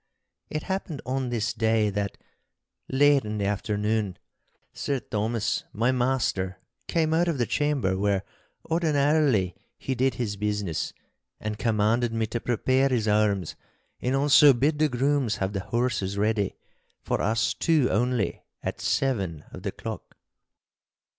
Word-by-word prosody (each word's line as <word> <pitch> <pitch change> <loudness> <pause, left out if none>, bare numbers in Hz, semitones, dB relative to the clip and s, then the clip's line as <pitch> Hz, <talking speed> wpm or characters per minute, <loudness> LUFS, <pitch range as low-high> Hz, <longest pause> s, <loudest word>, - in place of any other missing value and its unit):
It 155 - -3
happened 190 -6 -3
on 130 0 -1
this 115 -2 -1
day 110 -2 +2
that, 100 0 -3 0.7
late 140 +1 +5
in 105 0 -4
the 100 - -1
afternoon, 105 0 -1 0.6
Sir 140 - -1
Thomas, 110 0 -1
my 115 +4 +2
master, 120 -7 0 0.3
came 160 -2 +1
out 170 +2 +3
of 165 -4 0
the 120 - +1
chamber 140 -12 0
where 100 0 +1 0.4
ordinarily 145 - +2 0.2
he 135 - -3
did 130 +1 +1
his 105 -5 -3
business, 105 -6 -2 0.5
and 105 0 -4
commanded 115 +1 +1
me 115 -1 0
to 120 +2 -3
prepare 130 +3 +1
his 115 -4 0
arms, 105 -4 +1 0.5
and 125 +2 0
also 145 +1 +7
bid 145 +5 +1
the 155 -1 +3
grooms 135 -2 +1
have 95 +1 -2
the 100 - -1
horses 110 -3 -1
ready, 105 -1 +1 0.5
for - - -1
us 110 -1 +1
two 150 +3 +2
only, 120 -1 0 0.2
at - - -4
seven 95 - 0
of - - -9
the - - -3
clock. - - -8
115 Hz, 140 wpm, -26 LUFS, 105-135 Hz, 0.7 s, also